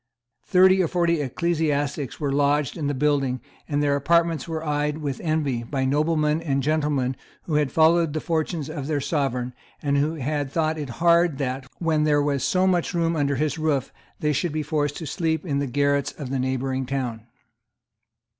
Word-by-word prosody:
Thirty 185 +1 +5
or 175 - +2
forty 170 -2 +1
ecclesiastics 145 -2 -1
were 145 -3 -1
lodged 145 0 +1
in 150 -4 -2
the 145 - -1
building; 135 -2 +1 0.3
and 145 0 +1
their 140 -1 +2
apartments 165 +1 +2
were 160 -1 -4
eyed 150 0 0
with 145 -4 -4
envy 155 -7 0
by 130 +3 -2
noblemen 150 +2 +1
and 140 -4 -1
gentlemen 145 -3 0 0.3
who 160 - -5
had 150 -2 +2
followed 165 -1 +4
the 155 - -1
fortunes 160 -2 -2
of 150 -3 -5
their 150 -2 0
Sovereign, 130 -4 -1 0.3
and 140 -1 +1
who 155 +2 -1 0.3
thought 155 +3 -1
it 145 -3 -5 0.2
hard 170 -3 +4
that, 135 -1 -3
when 160 -3 +1
there 150 -1 +3
was 140 -2 0
so 185 0 +2
much 180 -2 +1
room 165 -1 +1
under 140 -2 +1
his 155 +4 -1
roof, 155 -4 0 0.3
they 150 0 +1
should 170 +4 -1
be 155 0 -1
forced 145 -1 -1
to 165 - -6
sleep 160 +2 -1
in 140 -4 0
the 140 - -1
garrets 140 +1 +1
of 135 -4 -6
the 135 - -1
neighbouring 130 0 -1
town. 125 -4 -3
150 Hz, 185 wpm, -24 LUFS, 140-160 Hz, 0.3 s, Thirty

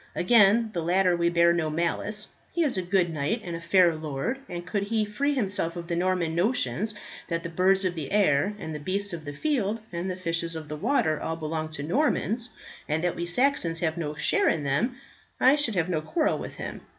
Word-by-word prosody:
Against 220 +2 +4
the 170 - -1
latter 180 +2 +3
we 170 0 +2
bear 170 0 +4
no 165 -2 0
malice, 170 +6 -1 0.2
he 340 - +1
is 290 - 0
a 185 - 0
good 180 -2 +1
knight 155 +10 -1
and 170 -1 -4
a 165 - -6
fair 170 0 +4
lord; 155 - -3
and 175 0 -6
could 200 +3 -1
he 215 +2 0
free 280 +8 -1
himself 195 -8 -1
of 170 -1 -6
the 170 - -1
Norman 180 -2 0
notions 215 +3 0 0.3
that 170 -1 -2
the 170 - -4
birds 190 +3 +2
of 180 - 0
the 155 -5 -6
air, 200 -1 +2
and 160 -6 -6
the 150 - -5
beasts 195 +5 -1
of 160 -2 -6
the 145 - -4
field, 225 - 0
and 175 +2 -3
the 185 - -2
fishes 170 -2 -3
of 155 -2 -7
the 150 - -4
water, 160 - +1
all 160 - -2
belong 155 0 -3
to 155 -2 -6
Normans, 240 - 0 0.4
and 155 +2 0
that 175 - 0
we 170 - -3
Saxons 180 -5 +2
have 160 -2 0
no 155 -3 -4
share 150 - +2
in 155 - 0
them, 205 - 0 0.4
I 265 +3 +6
should 285 -8 +2
have 170 -2 +1
no 165 -4 -1
quarrel 310 - 0
with - - -7
him. - - -6
175 Hz, 225 wpm, -26 LUFS, 165-210 Hz, 0.4 s, I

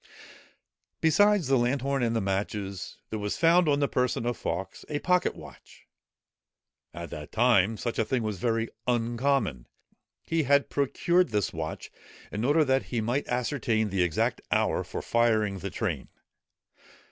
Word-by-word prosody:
Besides 200 +3 +4
the 135 -1 +3
lanthorn 135 +2 0
and 115 -1 +1
the 115 - +1
matches, 95 0 -3
there 110 - -3
was 105 0 -3
found 170 0 +4
on 145 0 +2
the 140 - +3
person 125 -3 0
of 120 0 0
Fawkes, 95 +1 -4
a 150 - -1
pocket 180 +4 +1
watch! - - -14 1.1
At 85 +1 -8
that 75 -1 -8
time, 110 -2 +3
such 120 +1 -3
a - - +4
thing 120 +2 -1
was 105 -4 -3
very 115 +1 0 0.2
uncommon. 120 - 0 0.6
He 165 0 0
had 140 0 +2
procured 170 +6 +2
this 105 -4 -1
watch 80 -1 -5 0.4
in 105 - -3
order 150 +4 +3
that 135 0 +1
he 120 - -2
might 120 +6 -1
ascertain 115 -4 0
the 95 -1 +1
exact 90 -3 0
hour - - +1
for - - -6
firing 110 -4 +1
the 100 - -4
train. 90 - -3
120 Hz, 155 wpm, -28 LUFS, 105-140 Hz, 1.1 s, Besides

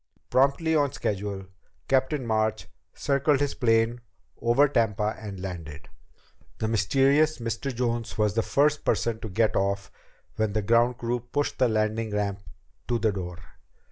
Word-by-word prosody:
Promptly 140 +5 +3
on 145 -3 +2
schedule, 100 -4 -3 0.4
Captain 135 +1 +1
March 110 -1 0 0.2
circled 140 0 +1
his 145 -1 0
plane 115 0 +2 0.4
over 120 +5 +4
Tampa 110 -5 0
and 100 -3 -7
landed. 80 -6 -7 0.7
The 110 - -1
mysterious 135 +8 +3
Mr. 115 +3 -3
Jones 120 -2 -2
was 105 -2 +2
the 115 - +2
first 145 +6 +2
person 115 -2 0
to 110 - -6
get 110 +3 +1
off 100 +1 -1 0.5
when 110 -2 0
the 110 0 0
ground 120 +3 +3
crew 120 +1 -1
pushed 125 +5 -3
the 130 - +5
landing 110 +1 0
ramp 100 -1 -1
up 100 - -25 0.4
to 120 - +1
the 110 -1 +1
door. 90 -3 -5
115 Hz, 150 wpm, -26 LUFS, 105-130 Hz, 0.7 s, the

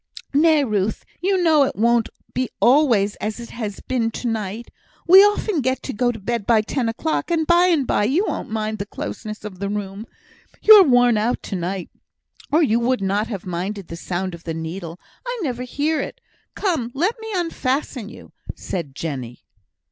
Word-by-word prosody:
"Nay, 310 0 +4
Ruth, 215 -4 -1 0.2
you 375 0 +1
know 315 -3 +5
it 275 - +1
won't 235 +1 +2 0.2
be 255 -1 -1
always 235 -7 +4
as 215 +2 -4
it 235 - -9
has 215 -4 -5
been 240 -3 -1
to 240 - -5
night. 220 0 -4 0.4
We 375 +3 +10
often 415 -4 +1
get 260 0 -1
to 270 - -4
bed 235 -2 -1
by 225 -2 +5
ten 235 +1 -1
o'clock; 315 +11 -2
and 330 -2 +1
by 345 +2 +5
and 320 -7 +2
by 205 - +1
you 310 - +2
won't - - -4
mind 215 0 -3
the 200 - -4
closeness 215 0 -6
of 190 -4 -8
the 200 0 -2
room. 205 +1 -5 0.5
You're 430 -1 +9
worn 245 -4 +4
out 230 +4 -1
to 200 - -5
night, 180 +1 -4 0.6
or 320 +3 +4
you 235 -5 +2
would 240 -3 0
not 200 +3 0
have 200 -6 -6
minded 185 +2 -4
the 170 - -6
sound 180 +2 -3
of 170 0 -10
the 165 -1 -4
needle; 165 +1 -6 0.2
I - - -4
never 250 -5 -3
hear 290 +5 -1
it. - - -7 0.4
Come, 325 - -1
let 375 - 0
me 445 - -8
unfasten 275 - -2
you," - - -13 0.2
said 150 -7 -5
Jenny. 130 -7 -6
235 Hz, 185 wpm, -21 LUFS, 200-290 Hz, 0.6 s, We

